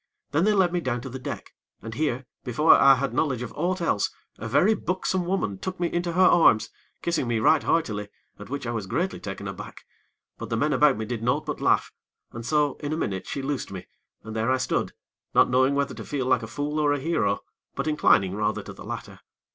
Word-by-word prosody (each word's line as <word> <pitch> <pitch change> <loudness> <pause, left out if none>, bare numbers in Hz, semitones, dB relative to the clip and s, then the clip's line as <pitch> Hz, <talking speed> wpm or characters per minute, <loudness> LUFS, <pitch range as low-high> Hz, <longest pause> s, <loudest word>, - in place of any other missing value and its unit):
Then 160 +5 +2
they 215 - +4
led 185 -3 +3
me 175 - 0
down 125 -5 -1
to 130 - -7
the 130 +1 -7
deck, - - -7 0.3
and 115 0 -6
here, 135 -2 -1 0.2
before 150 +7 +5
I 135 0 +7
had 130 -2 -2
knowledge 130 -3 0
of 120 - -7
aught 180 +1 -1
else, 135 -11 +1 0.3
a 115 - -5
very 160 - +4
buxom 185 -2 -1
woman 140 - -1
took 185 -1 -5
me 175 -1 -1
into 175 0 -1
her 185 +2 +4
arms, 165 -11 +5 0.3
kissing 170 -7 0
me 120 -1 +1
right 145 +8 +4
heartily, 105 -11 0 0.3
at - - -10
which 140 -1 -4
I 120 - -2
was 110 -4 -4
greatly 180 - -1
taken 100 0 -6
aback; 95 -1 -8 0.5
but - - -6
the - - -1
men - - +1
about - - +4
me 110 - -3
did 115 0 -4
naught 135 +6 0
but 150 - -4
laugh, - - +2 0.4
and 115 - -7
so, 145 +2 +1
in 145 0 -4
a - - -2
minute, 95 - -3
she 140 - -4
loosed 140 -1 -3
me, 95 -2 -7 0.4
and 110 0 -8
there 110 +2 0
I 130 - +3
stood, 130 - -1 0.4
not - - +5
knowing 130 +2 +3
whether 140 0 0
to - - -8
feel 140 -3 -3
like 130 - +3
a 110 - -6
fool 145 +5 -3
or 145 -1 +3
a 145 - -1
hero; 120 -10 0 0.3
but - - -2
inclining 110 -11 +3
rather 105 +1 -1
to - - -9
the - - -11
latter. - - -7
135 Hz, 230 wpm, -25 LUFS, 115-160 Hz, 0.5 s, I